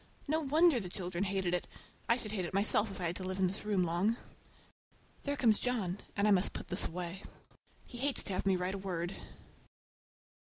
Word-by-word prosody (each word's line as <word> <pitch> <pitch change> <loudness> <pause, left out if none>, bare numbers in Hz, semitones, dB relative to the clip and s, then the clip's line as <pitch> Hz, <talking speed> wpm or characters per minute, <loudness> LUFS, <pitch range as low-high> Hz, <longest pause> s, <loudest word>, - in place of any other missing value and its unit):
No 315 +3 +1
wonder 310 0 +4
the 185 -5 -5
children 180 +1 -2
hated 190 -2 0
it! 180 - 0 0.4
I 235 - +5
should 215 -4 -6
hate 200 -4 -1
it 175 - -5
myself 205 +1 +3
if 195 - -8
I - - -3
had 170 0 0
to 190 - -5
live 185 0 -3
in 190 - +2
this 185 +3 -3
room 205 -3 +1
long. 180 +7 +1 1.1
There 285 0 -1
comes 225 -6 +4
John, 205 -7 -1 0.2
and 200 +1 +3
I - - +5
must 190 -1 +4
put - - -7
this 180 - +1
away,—he 180 +7 -9
hates 275 +1 +3
to 195 - -2
have 185 - -1
me 190 - +4
write 180 +1 -1
a 195 - -4
word. 180 -2 -3
195 Hz, 205 wpm, -33 LUFS, 180-220 Hz, 1.1 s, I